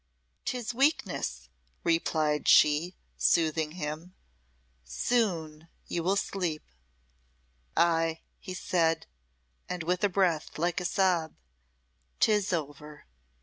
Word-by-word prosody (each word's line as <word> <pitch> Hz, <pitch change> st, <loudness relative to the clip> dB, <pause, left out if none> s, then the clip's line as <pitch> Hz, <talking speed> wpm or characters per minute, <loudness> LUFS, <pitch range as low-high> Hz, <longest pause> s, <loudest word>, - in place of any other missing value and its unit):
"'Tis 245 Hz, -1 st, -3 dB
weakness," 275 Hz, +6 st, 0 dB, 0.4 s
replied 155 Hz, -3 st, +1 dB
she, 150 Hz, +5 st, +5 dB, 0.2 s
soothing 160 Hz, -2 st, +2 dB
him. 165 Hz, +2 st, -6 dB, 0.7 s
"Soon 160 Hz, -, -1 dB, 0.2 s
you 170 Hz, -, -2 dB
will 185 Hz, +4 st, +1 dB
sleep." 180 Hz, -6 st, -2 dB, 1.1 s
"Ay," 165 Hz, -1 st, +2 dB, 0.2 s
he 185 Hz, -2 st, -7 dB
said, 165 Hz, -3 st, +1 dB, 0.8 s
with 180 Hz, +4 st, -1 dB
a 205 Hz, -, +4 dB
breath 180 Hz, -5 st, 0 dB
like 175 Hz, +3 st, 0 dB
a -, -, -4 dB
sob. 175 Hz, -4 st, +1 dB, 0.8 s
"'Tis 210 Hz, -3 st, +3 dB
over." 150 Hz, -2 st, -5 dB
170 Hz, 95 wpm, -29 LUFS, 155-185 Hz, 1.1 s, she